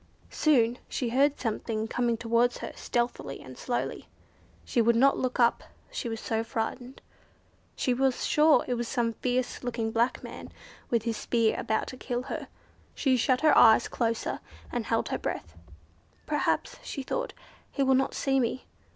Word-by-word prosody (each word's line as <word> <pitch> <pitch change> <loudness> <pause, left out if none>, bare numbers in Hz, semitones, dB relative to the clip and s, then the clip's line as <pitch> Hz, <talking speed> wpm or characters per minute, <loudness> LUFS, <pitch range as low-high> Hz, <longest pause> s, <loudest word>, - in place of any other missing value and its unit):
Soon 245 -6 +3
she 245 - -2
heard 275 +4 +2
something 220 -1 -2
coming 235 0 0
towards 235 +2 +2
her - - -6
stealthily 240 0 -2
and - - -11
slowly. - - -3 0.6
She 240 - +1
would 235 +1 +4
not 275 +4 +4
look 255 -1 -2
up 235 -1 +3 0.3
she 285 - -3
was 225 -1 -4
so 225 0 -1
frightened. 245 +2 -4 0.7
She 255 - +1
was 265 0 +1
sure 305 +1 +4
it 250 - 0
was 240 -1 -2
some 235 -2 0
fierce 250 +2 -2
looking 230 -2 -2
black 235 +3 +1
man, - - -8 0.4
with 235 -2 +1
his 230 -1 -2
spear, 230 -2 +1
about 220 - -1
to 255 - -8
kill 245 -1 -3
her. - - -5 0.5
She 265 -3 +2
shut 255 +1 +2
her 310 -1 +5
eyes 225 0 +7
closer, 230 -2 -1 0.3
and - - -3
held - - 0
her - - -2
breath. 80 - -4 0.7
"Perhaps," - - 0
she 275 - -5
thought, - - -3 0.4
"he 275 - 0
will 265 0 +4
not 265 +1 +1
see 270 -1 +1
me." 250 +1 -1
245 Hz, 170 wpm, -28 LUFS, 230-265 Hz, 0.7 s, eyes